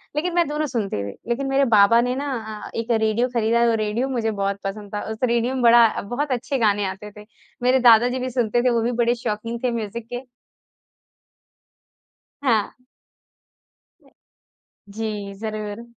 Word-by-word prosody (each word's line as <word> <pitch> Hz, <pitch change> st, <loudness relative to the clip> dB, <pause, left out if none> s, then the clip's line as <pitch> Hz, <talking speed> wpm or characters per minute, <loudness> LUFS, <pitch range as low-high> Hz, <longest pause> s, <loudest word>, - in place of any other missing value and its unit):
लेकिन 345 Hz, +3 st, -1 dB
मैं 345 Hz, -3 st, +3 dB
दोनों 300 Hz, +1 st, -2 dB
सुनती 205 Hz, -, -2 dB
हुँ। 100 Hz, 0 st, -5 dB, 0.2 s
लेकिन 270 Hz, +3 st, -1 dB
मेरे 275 Hz, 0 st, +3 dB
बाबा 210 Hz, +3 st, +6 dB
ने 250 Hz, +1 st, -1 dB
ना 225 Hz, -7 st, -5 dB
एक 230 Hz, +1 st, -2 dB
रेडियो 220 Hz, +2 st, +2 dB
खरीदा 235 Hz, +1 st, +2 dB
वो -, -, +2 dB
रेडियो 225 Hz, +6 st, -1 dB
मुझे 230 Hz, -4 st, -1 dB
बहुत 200 Hz, -1 st, -2 dB
पसंद 205 Hz, +1 st, -6 dB
था, 205 Hz, -, -2 dB
उस 220 Hz, -, -5 dB
रेडियो 240 Hz, +1 st, +1 dB
में 255 Hz, -2 st, -2 dB
बड़ा 235 Hz, -1 st, +5 dB
बहुत 260 Hz, +7 st, -3 dB
अच्छे 265 Hz, +3 st, -1 dB
गाने 205 Hz, -2 st, +2 dB
आते 195 Hz, +2 st, -6 dB
थे। 210 Hz, -, -11 dB, 0.4 s
मेरे 255 Hz, +1 st, +4 dB
दादाजी 245 Hz, +3 st, +4 dB
भी 255 Hz, +1 st, -3 dB
सुनते 240 Hz, -1 st, 0 dB
थे 250 Hz, -, +3 dB
वो 235 Hz, -1 st, +1 dB
भी 240 Hz, +2 st, 0 dB
बड़े 240 Hz, +1 st, +2 dB
शौकीन 230 Hz, 0 st, -4 dB
थे 250 Hz, -, +1 dB
म्यूज़िक 230 Hz, 0 st, -5 dB
के। 245 Hz, +2 st, -4 dB, 2.2 s
हाँ। 225 Hz, -7 st, +1 dB, 2.2 s
जी, 210 Hz, -2 st, -5 dB
ज़रूर। 215 Hz, 0 st, -5 dB
230 Hz, 160 wpm, -22 LUFS, 210-250 Hz, 2.2 s, बाबा